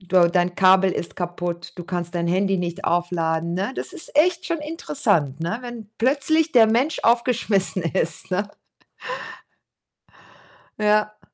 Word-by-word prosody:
du 180 -2 +3
dein 175 0 0
Kabel 190 0 +5
ist 170 - -4
kaputt, 175 -1 -4
du 175 - -7
kannst 175 -1 -4
dein 170 0 -1
Handy 195 +2 +1
nicht 175 +2 -4
aufladen, 170 -1 0
ne? 195 +5 -1
Das - - -2
ist 355 -6 -5
echt 350 +2 +3
schon 335 -1 -1
interessant, 155 - 0
ne, 170 +7 -2
wenn 240 -4 -9
plötzlich 290 +6 +2
der 235 -5 +6
Mensch 250 +8 +1
aufgeschmissen 230 -6 +2
ist, 165 +1 -2
ne? 200 +3 0 2.3
Ja. 210 0 +1
190 Hz, 140 wpm, -22 LUFS, 175-235 Hz, 2.3 s, der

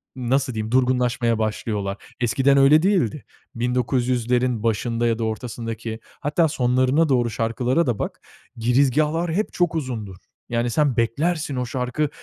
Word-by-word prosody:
nasıl 130 0 0
diyeyim 110 +1 -4
durgunlaşmaya 125 -2 +1
başlıyorlar. 105 -2 -2 0.2
Eskiden 135 +4 +3
öyle 145 +3 +6
değildi. 175 - +1 0.3
1900''lerin 125 -1 0
başında 115 +1 0
ya 115 0 0
da 115 - -1
ortasındaki 115 0 -4 0.2
hatta 155 +3 +2
sonlarına 130 +2 +2
doğru 120 -3 +2
şarkılara 120 +8 0
da 115 -4 -1
bak. - - -4 0.4
Girizgâhlar 145 +7 +2
hep 210 +5 -1
çok 175 -2 +1
uzundur. 115 - -4 0.3
Yani 120 0 0
sen 140 0 +1
beklersin 145 +6 0
o 125 -1 -1
şarkı 125 +4 -2
125 Hz, 135 wpm, -22 LUFS, 115-140 Hz, 0.4 s, öyle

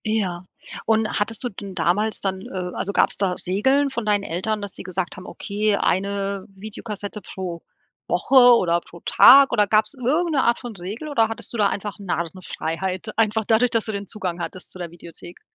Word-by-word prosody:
Ja. 190 -5 -1 0.4
Und 220 0 +2
hattest 220 +3 -2
du 245 - -1
denn 195 -2 -9
damals 205 +5 +1
dann, 190 -1 -2
äh 180 -1 -4
also, 200 - -2
gab's - - +2
da 195 -2 +1
Regeln 265 +10 +2
von 240 -4 -4
deinen 205 -1 +2
Eltern, 205 +5 -2
dass 200 -1 -5
die - - -8
gesagt 185 -1 -4
haben: 185 - -10
„Okay, 210 0 -1
eine 200 +1 -1
Videokassette 210 +1 -7
pro 175 -2 -6 0.5
Woche 275 - 0 0.2
oder 170 -4 +2
pro 170 0 -15
Tag.“ 275 +2 +8
Oder 210 -4 +3
gab's 215 +1 +2
irgend 300 +7 0
'ne 280 -4 +2
Art 235 0 +2
von 240 -4 -8
Regel 200 - -6
oder 230 -7 +2
hattest 225 +1 -6
du - - -3
da 205 -2 +4
einfach 205 +1 -5
Narrenfreiheit, 185 +1 -4
einfach 220 -1 +1
dadurch, 230 +3 +3
dass 230 -2 +1
du 220 - -3
den 200 -1 -5
Zugang 180 -4 -4
hattest 180 +1 -7
zu 185 - -9
der 175 -1 -5
Videothek? 170 0 -12
205 Hz, 195 wpm, -22 LUFS, 185-220 Hz, 0.5 s, Tag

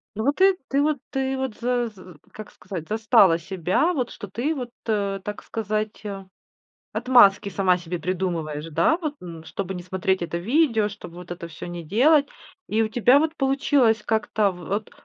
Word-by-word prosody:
Ну 220 - -2
вот, 285 +1 +2
ты 385 0 +5
ты 275 +1 +2
вот 300 0 +1
ты 265 0 -1
вот, 265 -4 -3
за 245 0 0
з 185 -4 -14 0.2
как 215 -1 -9
сказать, 180 -4 -8
застала 210 -5 +4
себя, 190 - 0
вот 255 -7 -1
что 205 - -9
ты 245 +11 -2
вот, 250 -4 -5 0.2
а, 200 -3 0
так 205 +2 -7
сказать, 215 0 -3
а, 195 -2 -6 0.7
отмазки 205 -6 +5
сама 185 -1 +2
себе 175 0 -5
придумываешь, 165 -4 -3
да, 315 - +3
вот, 305 -4 -3
м 165 -2 -9
чтобы 190 +2 -5
не 180 - -6
смотреть 190 +1 -1
это 170 0 -3
видео, 230 - +2
чтобы 195 -4 -11
вот 180 0 -11
это 175 -1 -6
всё 160 - -9
не 175 -1 -7
делать. 280 - +4 0.4
И 220 +1 +2
у 220 - 0
тебя 245 +4 +4
вот 320 +1 -1
получилось 270 -4 +2
как-то, 220 -2 +1
а, - - 0
в - - -12
вот, 205 +2 -2
210 Hz, 190 wpm, -24 LUFS, 185-255 Hz, 0.7 s, ты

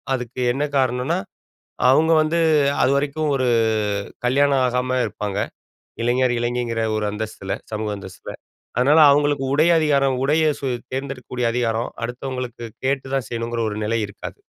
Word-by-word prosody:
அதுக்கு 125 0 -6
என்ன 140 +3 -1
காரணனா, 130 +6 +1 0.7
அவுங்க 160 +5 +4
வந்து 160 +2 +1 0.4
அதுவரைக்கும் 145 +3 +1
ஒரு 130 -1 0 0.8
கல்யாணம் 140 +1 +3
ஆகாம 125 +1 0
இருப்பாங்க. 105 -1 -4 0.6
இளைஞர், 125 +1 +2
இளைஞிங்கிற 120 -1 -1 0.2
ஒரு 105 - -1
அந்தஸ்தில 105 -2 -5 0.2
சமூக 105 0 -2
அந்தஸ்தில. 95 -2 -9 0.4
அதனால 145 +6 +5
அவுங்களுக்கு 145 -1 +2
உடை 155 +3 +4
அதிகாரம், 140 -3 +2
உடைய 155 +3 +3 0.2
சு 135 - -2 0.3
தேர்ந்தெடுக்கக்கூடிய 130 -2 -4
அதிகாரம் 115 -1 0 0.2
அடுத்தவங்களுக்கு 125 -1 -5 0.2
கேட்டுதான் 135 -1 -1
செய்யணுங்கிற 115 0 -3
ஒரு 105 - -5
நிலை 115 +2 0
இருக்காது. 100 - -9
130 Hz, 125 wpm, -21 LUFS, 120-140 Hz, 0.8 s, அதனால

